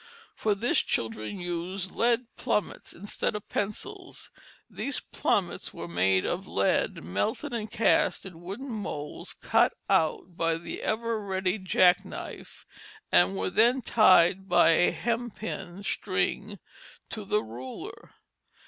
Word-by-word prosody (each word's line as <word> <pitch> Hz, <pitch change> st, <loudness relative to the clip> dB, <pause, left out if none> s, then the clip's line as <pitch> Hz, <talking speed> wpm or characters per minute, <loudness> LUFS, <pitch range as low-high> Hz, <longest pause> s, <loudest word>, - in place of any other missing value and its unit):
For 210 Hz, -2 st, +1 dB
this 230 Hz, +5 st, +2 dB
children 110 Hz, -, -2 dB
used 175 Hz, +2 st, -3 dB
lead 240 Hz, +1 st, +2 dB
plummets 210 Hz, -, -2 dB
instead 205 Hz, +3 st, -3 dB
of 210 Hz, -, -6 dB
pencils. 205 Hz, +1 st, -5 dB, 0.4 s
These -, -, -3 dB
plummets -, -, -1 dB
were 85 Hz, -, -6 dB
made 95 Hz, +2 st, +2 dB
of 185 Hz, +2 st, -2 dB
lead 100 Hz, -4 st, +1 dB
melted 100 Hz, -, -2 dB
and 220 Hz, -2 st, -3 dB
cast 220 Hz, -, +2 dB
in 175 Hz, -3 st, -10 dB
wooden 200 Hz, +10 st, -6 dB
moulds 155 Hz, -9 st, -5 dB
cut -, -, +2 dB, 0.2 s
out 165 Hz, +2 st, +1 dB
by 165 Hz, -1 st, +1 dB
the 165 Hz, -, -6 dB
ever 230 Hz, 0 st, -1 dB
ready 190 Hz, +1 st, -1 dB
jackknife 185 Hz, -1 st, +1 dB, 0.5 s
and 90 Hz, +2 st, +5 dB
were 95 Hz, 0 st, -1 dB
then 240 Hz, +3 st, +4 dB
tied 190 Hz, -3 st, +5 dB
by -, -, +6 dB
a 165 Hz, +2 st, +4 dB
hempen 220 Hz, -5 st, -4 dB
string -, -, -1 dB, 0.5 s
to 215 Hz, -, -5 dB
the 210 Hz, +2 st, 0 dB
ruler. 120 Hz, +4 st, -9 dB
190 Hz, 125 wpm, -28 LUFS, 165-215 Hz, 0.5 s, by